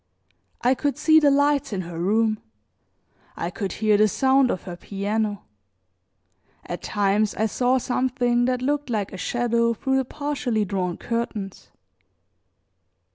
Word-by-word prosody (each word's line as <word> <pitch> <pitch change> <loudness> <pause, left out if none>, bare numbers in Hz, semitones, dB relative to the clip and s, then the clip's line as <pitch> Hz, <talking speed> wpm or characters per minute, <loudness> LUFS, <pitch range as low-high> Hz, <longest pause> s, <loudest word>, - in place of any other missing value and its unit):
I 250 +2 +4
could 285 +2 -1
see 315 0 +5
the 295 -2 +4
lights 285 -1 +2
in 195 -3 -2
her 170 -1 -7
room, 215 +4 +1 1.0
I 170 - -3
could 195 0 -4
hear 215 -1 +2
the 215 +1 +5
sound 265 +3 +3
of 185 - -2
her 180 -2 -7
piano, 205 +2 -2 1.2
at 175 - -5
times 205 +1 +1
I 220 - +1
saw 250 +4 +1
something 245 -1 +1
that 250 0 -1
looked 290 0 -1
like 210 -5 -2
a - - -6
shadow 235 +3 0
through 265 +4 0
the 265 - 0
partially 255 -6 -2
drawn 185 -3 -2
curtains. 220 -4 -4
230 Hz, 140 wpm, -24 LUFS, 200-260 Hz, 1.2 s, see